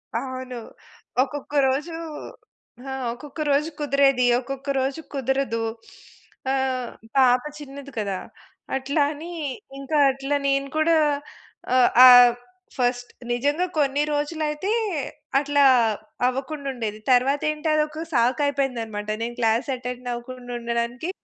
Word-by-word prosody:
అవును. 255 Hz, -1 st, -4 dB, 0.7 s
ఒక్కొక్క 285 Hz, +2 st, -7 dB
రోజు 285 Hz, +6 st, -1 dB, 0.9 s
హా! 270 Hz, -, -5 dB, 0.2 s
ఒక్కొక్క 290 Hz, +5 st, -11 dB
రోజు 300 Hz, +3 st, +2 dB
కుదిరేది. 275 Hz, -3 st, +3 dB
ఒక్కొక్క 270 Hz, +2 st, -7 dB
రోజు 270 Hz, +4 st, -2 dB
కుదరదు. 265 Hz, -3 st, -1 dB, 0.9 s
ఆహ్, 260 Hz, -2 st, -1 dB, 0.3 s
పాప 250 Hz, -1 st, +5 dB, 0.2 s
చిన్నది 280 Hz, -1 st, -9 dB
కదా! 200 Hz, -3 st, -1 dB, 0.6 s
అట్లా 280 Hz, +3 st, 0 dB
అని 325 Hz, +4 st, -8 dB, 0.5 s
ఇంకా 285 Hz, +3 st, -1 dB
అట్లా 275 Hz, +2 st, -2 dB
నేను 275 Hz, 0 st, +1 dB
కూడా 325 Hz, +1 st, +4 dB, 0.8 s
ఆహ్, 255 Hz, -1 st, +6 dB, 0.2 s
ఆహ్, 245 Hz, -1 st, +9 dB, 0.4 s
ఫస్ట్ 245 Hz, 0 st, 0 dB, 0.2 s
నిజంగా 290 Hz, +8 st, +1 dB
కొన్ని 285 Hz, 0 st, +2 dB
రోజులైతే 300 Hz, +5 st, -2 dB, 0.7 s
అట్లా 285 Hz, 0 st, +2 dB, 0.6 s
అవ్వకుండుండేది. 260 Hz, -5 st, -3 dB
తరువాతేంటి 290 Hz, +5 st, +2 dB
అదొక 305 Hz, +1 st, 0 dB
సాకు 250 Hz, +4 st, +2 dB
అయిపోయింది 270 Hz, -3 st, 0 dB
అన్నమాట. 210 Hz, -1 st, -6 dB
నేను 240 Hz, +1 st, -3 dB
క్లాస్ 230 Hz, +4 st, +1 dB
అటెండ్ 250 Hz, 0 st, -6 dB
అవ్వకుండుండడానికి 240 Hz, +2 st, -4 dB
270 Hz, 105 wpm, -24 LUFS, 245-290 Hz, 0.9 s, ఆహ్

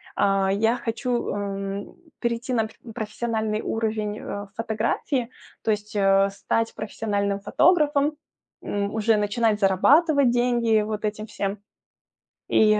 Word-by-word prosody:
а, 195 Hz, -1 st, +2 dB
я 225 Hz, +4 st, +2 dB
хочу, 240 Hz, +1 st, -2 dB
эм, 200 Hz, 0 st, -4 dB, 0.2 s
перейти 235 Hz, +2 st, -2 dB
на 225 Hz, -2 st, +2 dB
пр -, -, -17 dB, 0.2 s
профессиональный 220 Hz, 0 st, -2 dB
уровень, 215 Hz, -1 st, -2 dB
э, 205 Hz, 0 st, -6 dB
фотографии, 230 Hz, +3 st, -1 dB, 0.3 s
то 220 Hz, -, +1 dB
есть, 210 Hz, 0 st, -3 dB
э, 195 Hz, 0 st, +4 dB
стать 225 Hz, +3 st, -1 dB
профессиональным 205 Hz, -2 st, -2 dB
фотографом, 295 Hz, -, +3 dB, 0.5 s
м, 200 Hz, +1 st, -2 dB
уже 220 Hz, 0 st, +3 dB
начинать 210 Hz, +1 st, +1 dB
зарабатывать 275 Hz, -, +4 dB
деньги 240 Hz, -3 st, +2 dB
вот 215 Hz, 0 st, -3 dB
этим 215 Hz, +1 st, -3 dB
всем. 200 Hz, -1 st, -3 dB, 0.9 s
И 215 Hz, -1 st, +4 dB
215 Hz, 120 wpm, -24 LUFS, 205-235 Hz, 0.9 s, э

